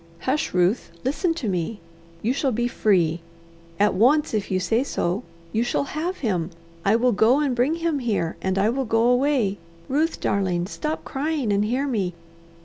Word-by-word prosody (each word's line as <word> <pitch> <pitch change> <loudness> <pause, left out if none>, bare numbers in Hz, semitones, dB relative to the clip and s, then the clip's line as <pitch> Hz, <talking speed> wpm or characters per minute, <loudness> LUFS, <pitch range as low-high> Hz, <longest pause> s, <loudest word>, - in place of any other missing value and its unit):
Hush, 295 +4 0
Ruth, 180 +3 +1 0.2
listen 330 +5 0
to 265 -9 -4
me! 185 +3 -2 0.4
You 235 +4 +2
shall 275 -1 0
be 240 +1 0
free! 175 -8 +2 0.6
At 205 +1 +4
once, 260 +10 +3
if 210 -3 -1
you 185 - +1
say 225 +7 +1
so! 185 -6 -1 0.3
You 225 - +2
shall 240 +3 0
have 320 +6 -3
him! 180 -6 0 0.3
I 200 +2 +4
will 245 +2 +3
go 230 +6 +4
and 280 -4 +1
bring 255 +7 +2
him 330 -3 -1
here, 210 -9 -1
and 190 0 -1
I 200 +3 +3
will 265 +2 -1
go 225 0 +2
away. 245 -5 +2 0.3
Ruth, 310 +5 0
darling, 185 -3 0
stop 305 - -4
crying 280 -5 -1
and 200 +1 +2
hear 250 +6 0
me. 200 -10 -1
235 Hz, 180 wpm, -24 LUFS, 195-280 Hz, 0.6 s, At